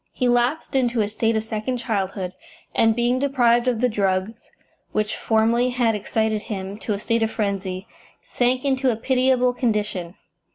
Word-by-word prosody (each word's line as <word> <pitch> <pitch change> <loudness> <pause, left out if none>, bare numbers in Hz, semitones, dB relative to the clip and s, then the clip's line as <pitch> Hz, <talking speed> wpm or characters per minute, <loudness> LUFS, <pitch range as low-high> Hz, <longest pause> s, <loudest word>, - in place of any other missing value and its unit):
He 250 - 0
lapsed 245 +5 +1
into 245 -3 +2
a - - -1
state 225 +2 0
of 220 - 0
second 220 +3 -3
childhood, 195 -5 -2 0.4
and, 225 -1 +3
being 240 +2 +1
deprived 245 -3 +3
of 240 -3 +1
the 250 - +4
drugs 200 0 -2 0.4
which 215 0 0
formerly 230 +3 +2
had 245 -2 +1
excited 215 +1 -1
him 200 -1 -6
to 215 - -2
a - - -2
state 230 +3 0
of 225 - +2
frenzy, 195 -3 -3 0.4
sank 250 +2 0
into 265 -1 +2
a 235 - +1
pitiable 255 +1 +2
condition. 210 -7 -2
225 Hz, 165 wpm, -23 LUFS, 210-245 Hz, 0.4 s, the